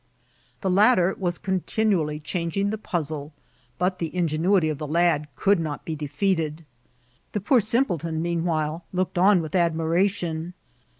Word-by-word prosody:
The 190 - 0
latter 195 -2 +4
was 175 -2 -1
continually 190 -4 0
dianging 175 +5 -2
tiie 215 0 -4
pmzle, 155 -5 -3 0.5
hot 185 +1 0
the 165 0 -4
ingenuity 170 +1 +2
of 150 -2 -3
the 150 - -4
lad 160 -1 +2
could 200 -2 +3
not 150 -5 -4
be 160 - -3
defeated. 155 +1 -1 0.7
The 210 - 0
poor 240 +4 +4
simpleton 180 - 0
meanwhile 165 -1 -1
looked 185 -1 -1
on 190 -2 +5
with 155 - -7
admiration. 170 0 0
170 Hz, 135 wpm, -24 LUFS, 155-190 Hz, 0.7 s, on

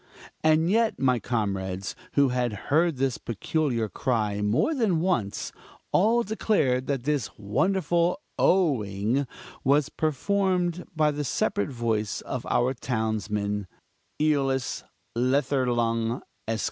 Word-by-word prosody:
And 155 +1 +4
yet 225 +1 +2
my 125 -2 +2
comrades, 95 -4 -2 0.2
who 140 -2 +4
had 125 -2 0 0.2
heard 165 -1 +3
this 130 -2 0
peculiar 120 0 -1
cry 105 -1 -1
more 115 - +2
than 220 - +1
once, 160 - -1 0.4
all 230 +5 +4
declared 170 - +1
that 135 -4 -1
this 145 -5 0
wonderful 170 - +1 0.2
oh 160 - +3
ing 105 +8 -1 0.4
was 140 +1 +3
performed 180 +3 0
by 155 -1 +3
the 145 0 -3
separate 100 -6 0
voice 115 -5 -1
of 130 - -5
our 125 +2 +2
townsman, 105 -4 -2 0.5
Eolus 135 -4 +1 0.3
Letherlung, 120 -3 +1 0.2
Esq.! 110 0 -1
130 Hz, 115 wpm, -26 LUFS, 110-155 Hz, 0.5 s, And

